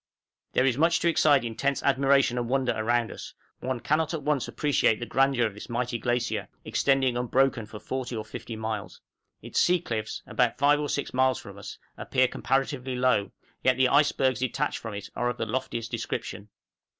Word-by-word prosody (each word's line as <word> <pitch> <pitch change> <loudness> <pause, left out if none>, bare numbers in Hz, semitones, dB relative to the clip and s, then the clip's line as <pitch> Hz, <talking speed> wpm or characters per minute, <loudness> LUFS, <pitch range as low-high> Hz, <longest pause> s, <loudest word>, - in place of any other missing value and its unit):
There 130 - +3
is 130 0 +1
much 165 +1 +4
to - - +2
excite 145 -5 +4
intense 140 +5 -1
admiration 135 -2 +3
and 120 -1 -3
wonder 130 -1 +1
around 115 +1 0
us; - - -9 0.2
one 130 -1 -3
cannot 155 +5 0
at 155 - -5
once 145 -3 0
appreciate 140 -7 +1
the 120 - -4
grandeur 135 0 +2
of 110 - -2
this 105 - -10
mighty 120 0 -2
glacier, 120 +1 -1 0.2
extending 135 -2 +2
unbroken 125 -1 +1
for 105 - -9
40 130 0 -4
or 110 -1 -4
50 110 +1 -7
miles. 110 -1 -5 0.4
Its - - -1
sea 180 0 +4
cliffs, 110 -7 -4
about 125 -2 +1
5 145 +2 +4
or 150 -1 -2
6 140 - -2
miles 130 -1 +3
from - - -10
us, - - -8 0.2
appear 130 -1 +2
comparatively 135 0 -1
low, 125 -5 +2 0.3
yet 130 -1 +3
the 130 -1 +4
icebergs 135 -3 +3
detached 135 +3 -1
from 110 -2 -6
it 100 - -7
are 120 - 0
of 120 - -4
the 115 - -2
loftiest 115 -1 -3
description. 115 -2 -4
130 Hz, 185 wpm, -27 LUFS, 115-135 Hz, 0.4 s, much